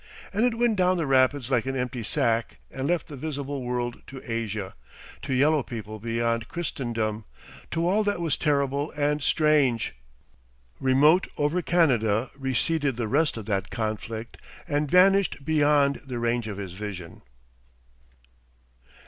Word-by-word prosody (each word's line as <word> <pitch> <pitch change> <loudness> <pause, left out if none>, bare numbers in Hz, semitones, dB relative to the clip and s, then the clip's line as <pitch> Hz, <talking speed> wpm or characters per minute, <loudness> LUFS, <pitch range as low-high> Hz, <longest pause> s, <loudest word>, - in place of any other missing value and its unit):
And 210 +3 +1
it 230 -2 -2
went 235 -3 +2
down 185 0 +3
the 165 - 0
rapids 135 -1 +2
like 125 -1 +1
an 135 - -2
empty 125 -1 -3
sack 115 -1 0
and 135 +1 -3
left 175 0 0
the 145 - -8
visible 140 -1 -4
world 120 -1 -3
to 135 - -8
Asia, 110 -4 -3 0.5
to - - -5
yellow 145 +4 +3
people 110 -3 -7
beyond 115 +1 -1
Christendom, 115 -10 -3 0.4
to 165 +1 0
all 205 +4 +3
that 205 -3 0
was 165 -3 0
terrible 140 -1 0
and 150 0 +1
strange! 140 - +2 0.9
Remote 150 +7 +4
over 150 +5 +1
Canada 125 -10 +2
receded 135 +1 0
the 120 -2 -1
rest 150 +3 +1
of 110 - -6
that 95 -2 -1
conflict 110 +1 -4 0.3
and 145 -2 0
vanished 185 -4 +4
beyond 145 -2 +3
the 130 -3 -5
range 120 -1 0
of 105 -2 -5
his 95 -3 -6
vision.... 95 -4 -7
135 Hz, 145 wpm, -26 LUFS, 115-150 Hz, 0.9 s, Remote